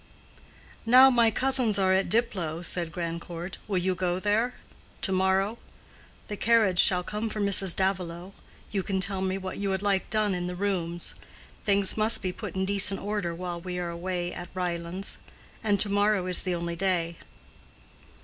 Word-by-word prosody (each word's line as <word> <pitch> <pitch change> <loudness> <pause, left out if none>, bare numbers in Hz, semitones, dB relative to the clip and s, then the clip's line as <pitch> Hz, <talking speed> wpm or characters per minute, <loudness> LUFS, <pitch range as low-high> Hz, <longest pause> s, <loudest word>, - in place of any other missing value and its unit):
"Now 255 +3 +8
my 235 -2 +5
cousins 255 -2 +3
are 190 -1 +3
at 190 +1 +1
Diplow," 185 -8 0
said 170 -1 0
Grandcourt, 170 +1 -5
"will 200 -3 0
you 185 +1 +1
go 180 0 -1
there?—to 210 0 -3
morrow? 190 +4 +1 0.7
The 210 - -4
carriage 215 -4 +3
shall 180 -1 +4
come 210 +4 -3
for 215 - -5
Mrs. 195 -3 +2
Davilow. 185 -1 -2 0.4
You 200 - 0
can 190 +1 -2
tell 190 0 -1
me 190 0 -1
what 190 0 -6
you 200 -1 -1
would 190 +1 -1
like 200 -2 +1
done 215 -2 +2
in 175 -1 -2
the 180 - -4
rooms. 175 -3 -1 0.5
Things 200 -1 +2
must 215 +1 +1
be 185 - -1
put - - -7
in 190 0 0
decent 200 0 +1
order 200 -4 -2
while 175 -1 -5
we 180 0 -5
are 175 -1 -3
away 175 0 -3
at 175 - -7
Ryelands. 175 +1 -4 0.4
And 205 -2 +2
to 210 - +4
morrow 205 -1 +2
is 180 -1 +2
the 180 -2 -1
only 170 0 -3
day." 170 -2 0
190 Hz, 170 wpm, -27 LUFS, 175-205 Hz, 0.7 s, Now